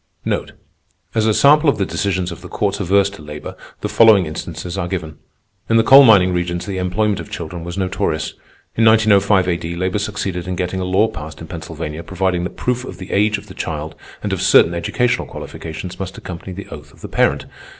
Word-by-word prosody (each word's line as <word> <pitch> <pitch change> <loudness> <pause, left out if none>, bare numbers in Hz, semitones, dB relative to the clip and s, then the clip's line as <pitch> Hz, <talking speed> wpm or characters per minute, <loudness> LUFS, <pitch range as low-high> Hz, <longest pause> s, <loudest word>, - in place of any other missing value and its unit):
As 110 -1 +1
a 110 - +3
sample 150 +2 +5
of - - +1
the 100 - 0
decisions 95 -2 -1
of 85 - -9
the - - -9
courts - - -1
adverse 100 +2 +3
to 100 - -12
labor, 75 0 -8 0.3
the - - -1
following 110 -5 +5
instances 85 +3 -6
are 95 -3 -2
given. 80 -5 -5 0.5
In 115 - +4
the 115 - +5
coal 135 +4 +9
mining 95 -7 +6
regions 85 0 -2
the 95 -2 -4
employment 100 +3 0
of - - -8
children 85 0 -6
was 85 +2 -6
notorious. 95 -4 -1 0.4
In 115 - +2
1905 105 -4 +4
A.D., 85 -1 -2
labor 95 +3 -1
succeeded 100 -4 -3
in 90 - -2
getting 90 +1 -2
a 90 - -2
law 95 +4 +3
passed 75 -4 -8
in 80 - -8
Pennsylvania 80 -1 -6
providing 90 0 -1
that - - -7
proof 125 0 -1
of - - -8
the 95 - -9
age 105 +1 +2
of 100 - -11
the 100 - -12
child 75 -2 -4 0.3
and - - -1
of - - -2
certain 85 - +5
educational 120 +8 0
qualifications 85 +3 -8
must 95 -1 -5
accompany 90 +1 -8
the 100 +3 -8
oath 75 0 -10
of - - -21
the - - -6
parent. - - +1
95 Hz, 205 wpm, -19 LUFS, 85-105 Hz, 0.5 s, coal